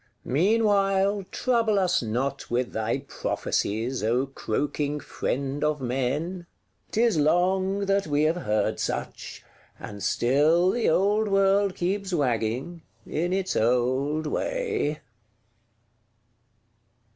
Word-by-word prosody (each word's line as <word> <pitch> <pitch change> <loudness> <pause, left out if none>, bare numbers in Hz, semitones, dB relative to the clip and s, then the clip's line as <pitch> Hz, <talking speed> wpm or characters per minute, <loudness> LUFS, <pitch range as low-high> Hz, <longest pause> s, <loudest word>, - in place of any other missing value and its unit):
Meanwhile, 195 - +2
trouble 230 -4 +1
us 185 -2 +2
not 125 +5 -3
with 120 +1 -1
thy 110 +4 -1
prophecies, 115 +5 -2
O 120 +5 +1
croaking 145 +3 -2
Friend 140 +1 -3
of 150 0 +1
Men: 140 +8 -2 0.4
'tis 225 -6 +2
long 185 +5 +2
that 195 -2 +1
we 145 0 +1
have 160 +3 +2
heard 105 -10 -1
such; - - -4 0.4
and 100 -1 -8
still 150 - +3
the 235 +1 +1
old 205 +5 +2
world 195 0 +3
keeps 195 +2 -2
wagging, 130 +2 -1 0.2
in 175 +3 -2
its 190 0 -1
old 130 +6 +1
way. 455 - -2
155 Hz, 105 wpm, -26 LUFS, 130-195 Hz, 0.4 s, still